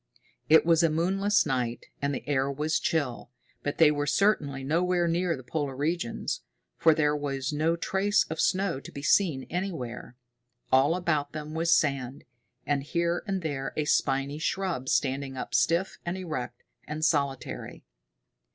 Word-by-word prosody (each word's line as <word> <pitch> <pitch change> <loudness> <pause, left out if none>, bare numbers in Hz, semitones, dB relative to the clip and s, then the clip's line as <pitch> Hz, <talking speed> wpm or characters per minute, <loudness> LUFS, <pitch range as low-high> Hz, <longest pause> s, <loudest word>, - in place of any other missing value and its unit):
It 160 +1 +7
was 165 -1 +4
a 165 - +4
moonless 195 +6 +2
night, 125 -4 -2 0.2
and 140 0 0
the 140 - -5
air 140 -1 +1
was 150 +3 0
chill, 140 -8 -1 0.3
but 145 - -3
they 160 -2 +6
were 145 -1 -1
certainly 145 -9 +1
nowhere 175 +4 +1
near 170 -1 0
the 130 - -10
polar 140 +1 -3
regions, 150 -2 -2 0.3
for 160 -1 +4
there 150 -1 +2
was 140 -1 -3
no 160 +3 +1
trace 195 +4 +1
of 160 - -2
snow 185 -6 +1
to - - -11
be 140 - -8
seen 150 -5 +3
anywhere. 155 -10 -4 0.6
All 135 +5 +4
about 155 -5 -1
them 155 0 -6
was 165 +1 +1
sand, 140 -4 +1 0.4
with 145 -1 +1
here 170 +4 -1
and 190 -3 -2
there 140 -4 -3
a 150 - 0
spiny 140 0 +1
shrub 170 -6 -2
standing 135 -1 0
up - - -5
stiff 170 +3 +1
and 175 +2 -3
erect 140 -9 -5 0.2
and 155 +1 -2
solitary. 140 -4 -1
150 Hz, 160 wpm, -28 LUFS, 135-170 Hz, 0.6 s, It